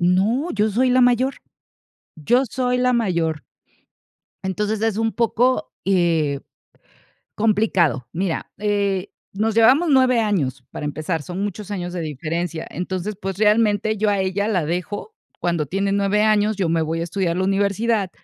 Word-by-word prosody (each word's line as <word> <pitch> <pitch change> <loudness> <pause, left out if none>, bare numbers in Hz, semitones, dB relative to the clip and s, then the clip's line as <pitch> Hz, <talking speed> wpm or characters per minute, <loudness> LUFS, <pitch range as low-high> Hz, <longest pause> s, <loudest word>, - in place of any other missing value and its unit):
No, 200 - +2
yo 210 0 +1
soy 250 +4 +2
la 255 - +4
mayor, 245 +2 +3 0.8
yo 240 - +2
soy 250 0 -1
la 250 0 +2
mayor. 170 - 0 1.0
Entonces, 210 +3 -2
es 225 -2 0
un 225 0 0
poco, 235 +2 +1
eh, 165 -7 +1 0.9
complicado, 195 - +1
mira, 180 -1 -2
eh, 200 -2 0 0.2
nos 215 +2 0
llevamos 265 +9 +5
9 255 -3 +4
años 145 - -1
para - - -6
empezar, 155 +3 -2
son 180 +6 -5
muchos 205 0 -5
años 180 -3 -4
de 180 - -4
diferencia, 160 +2 -3
entonces, 185 +3 -4
pues, 195 0 -4
realmente, 215 0 +2
yo 210 0 +1
a 200 - +1
ella 190 +2 -1
la 185 -8 0
dejo 180 - -4 0.3
cuando 170 -3 0
tiene 195 +6 -1
9 200 +1 +2
años, 215 0 +3
yo 190 -4 -1
me 165 0 +1
voy 165 +1 -2
a - - 0
estudiar 170 0 -1
la 185 - 0
universidad 200 +1 +1
200 Hz, 155 wpm, -21 LUFS, 175-220 Hz, 1.0 s, llevamos